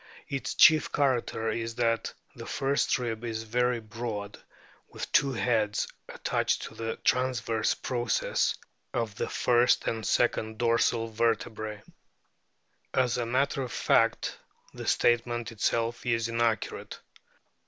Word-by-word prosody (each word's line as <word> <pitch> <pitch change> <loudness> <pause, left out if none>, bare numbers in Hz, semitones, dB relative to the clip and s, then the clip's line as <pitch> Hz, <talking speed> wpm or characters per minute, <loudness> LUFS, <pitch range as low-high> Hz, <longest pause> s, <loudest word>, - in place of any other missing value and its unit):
Its 135 -1 -3
chief 155 -1 +6
character 120 -5 0
is 115 0 -3
that 115 -1 0 0.2
"the - - -9
first 140 +2 +1
rib 115 -3 -4
is 115 -1 -3
very 125 +2 +1
broad 110 -2 -6 0.5
with - - -7
two 140 -2 +4
heads 110 -4 +1 0.2
attached - - -1
to - - -7
the 115 0 -4
transverse 125 -3 +1
processes 120 -2 0 0.4
of 115 -4 -1
the - - -3
first 120 0 +3
and 110 -1 -2
second 110 -1 +1
dorsal 115 0 +2
vertebrae." 110 -1 -1 1.1
As 125 -1 +2
a 120 - -1
matter 135 +3 +1
of 125 -2 -4
fact - - +1 0.3
the - - -7
statement 120 0 +1
itself 115 +2 -1
is 115 -1 0
inaccurate. 115 -2 -1
115 Hz, 120 wpm, -28 LUFS, 115-125 Hz, 1.1 s, chief